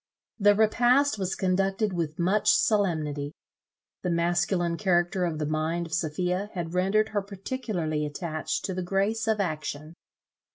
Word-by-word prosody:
The 205 0 +5
repast 240 +4 +3
was 190 -1 -1
conducted 195 +2 0
with 160 -3 -2
much 190 +4 +3
solemnity. 155 -8 0 0.7
The 180 - -2
masculine 175 0 +1
character 180 0 +1
of 165 -3 -2
the 150 - -2
mind 155 +3 -1
of 160 - -9
Sophia 180 +4 -1
had 170 -2 -4
rendered 195 +4 +2
her 205 -2 -1
particularly 195 -6 -3
attached 155 +2 -3
to 190 - -2
the 185 - -3
grace 200 +5 0
of 220 -1 +1
action. 155 -3 -3
180 Hz, 140 wpm, -27 LUFS, 165-205 Hz, 0.7 s, The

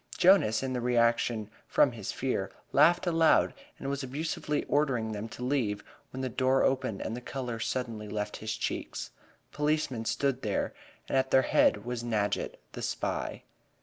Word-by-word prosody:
Jonas, 175 - +5
in 130 -1 -2
the 125 - -1
reaction 115 -2 +2 0.2
from 145 - +4
his 110 -5 -5
fear, 125 -7 -1 0.2
laughed 170 +6 +5
aloud, 165 -2 +4 0.2
and - - -6
was 140 0 -1
abusively 150 +2 -2
ordering 130 -7 +1
them 110 +1 -5
to 125 - -8
leave, 125 -6 0 0.3
when 130 - -6
the 130 - -1
door 130 +2 +2
opened 130 -6 0
and 110 - -3
the 125 - -6
color 125 -3 -4
suddenly 115 -3 -3
left 105 0 -3
his 110 -1 -4
cheeks. - - -3 0.4
Policemen 150 -6 0
stood 135 +1 0
there, 105 - -1 0.3
and 135 - +2
at 130 0 0
their 130 0 +5
head 105 -3 +3
was 120 -1 -3
Nadgett, 105 -3 -1
the - - -7
spy. - - -3
125 Hz, 165 wpm, -30 LUFS, 110-135 Hz, 0.4 s, Jonas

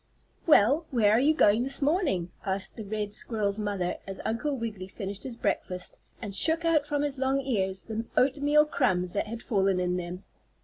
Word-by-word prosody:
"Well, 295 +3 +5
where 225 -6 +3
are 220 - +5
you 300 +4 +3
going 210 -4 +4
this 270 +2 -1
morning?" 280 - 0
asked 195 0 -2
the 220 - -6
red 210 0 -4
squirrel's 210 -3 -2
mother 200 -4 -2
as 195 - -6
Uncle 265 +6 -1
Wiggily 215 -6 -5
finished 195 0 -6
his 245 -3 -7
breakfast, 180 -5 -3 0.2
and 205 -3 -6
shook 325 - +3
out 310 -3 +2
from 290 -1 0
his 280 -2 -3
long 265 +1 +1
ears 195 -8 -1
the 225 0 -4
oatmeal 290 +3 +4
crumbs 185 - 0
that 205 - -1
had 230 +2 -6
fallen 195 -3 +1
in 180 0 0
them. 180 +2 -6
220 Hz, 185 wpm, -28 LUFS, 195-275 Hz, 0.2 s, Well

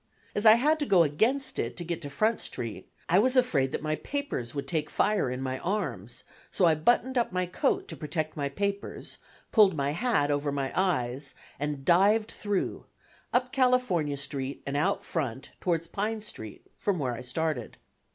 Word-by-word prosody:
As 205 +2 +3
I 215 - +11
had 300 +7 +3
to 290 - -1
go 185 -4 +6
against 225 - 0
it - - -2
to 175 - -4
get 170 0 -3
to 145 - -6
Front 215 +11 +1
Street, 115 -3 -6 0.2
I 180 +3 +5
was 255 +4 +3
afraid 145 - +3
that - - -3
my 155 0 0
papers 280 - -4
would 140 - -3
take 155 -3 -1
fire 210 -10 +2
in 125 +1 -3
my 130 0 -2
arms; 130 - -3 0.3
so 185 - +3
I 165 - +6
buttoned 240 - +2
up 235 - 0
my 185 0 0
coat 295 - 0
to - - -5
protect 155 0 -3
my 140 -2 -1
papers, 200 +6 -3 0.3
pulled 205 -6 +6
my 140 -1 0
hat 165 -5 +1
over 145 0 0
my 140 -1 -2
eyes, 140 -7 0 0.2
and 145 -2 -3
dived 205 +5 +4
through, 205 -2 -2 0.4
up 250 +1 +1
California 250 - +2
Street 140 -1 -4
and 140 - -3
out 145 - +1
Front 135 -5 -3
towards 170 -2 0
Pine 210 +5 -2
Street, 110 - -9
from 200 -3 0
where 130 -5 -1
I 115 - -6
started. 130 -1 -3
165 Hz, 185 wpm, -28 LUFS, 140-215 Hz, 0.4 s, I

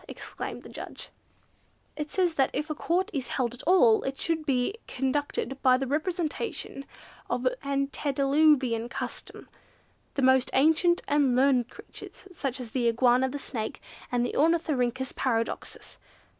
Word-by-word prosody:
exclaimed - - -7
the - - -10
judge. - - -8 0.9
"It 300 -1 -4
says 360 -1 +1
that 270 -4 +2
if 300 +2 -2
a - - +1
Court 360 +7 0
is 265 -4 -2
held 245 -3 -1
at 245 - -7
all, 245 -12 +6
it 270 0 -4
should 320 -2 -2
be 255 +4 +1
conducted 270 0 -2
by 255 -1 +5
the 270 - -2
representative 310 - -3 0.4
of - - 0
Antediluvian 275 -3 +2
custom, - - -6 0.7
the 275 - 0
most 260 0 +4
ancient 320 +5 +3
and 285 -4 +3
learned 255 -2 +3
creatures, - - -12
such 275 -6 -3
as 240 -3 -7
the 245 -1 +1
Iguana, 245 +2 +3
the 285 - -4
Snake, 225 -6 -4 0.3
and 245 -1 +1
Ornithorhynchus 265 -5 +1
Paradoxus. 230 -3 -2
275 Hz, 140 wpm, -28 LUFS, 250-305 Hz, 0.9 s, all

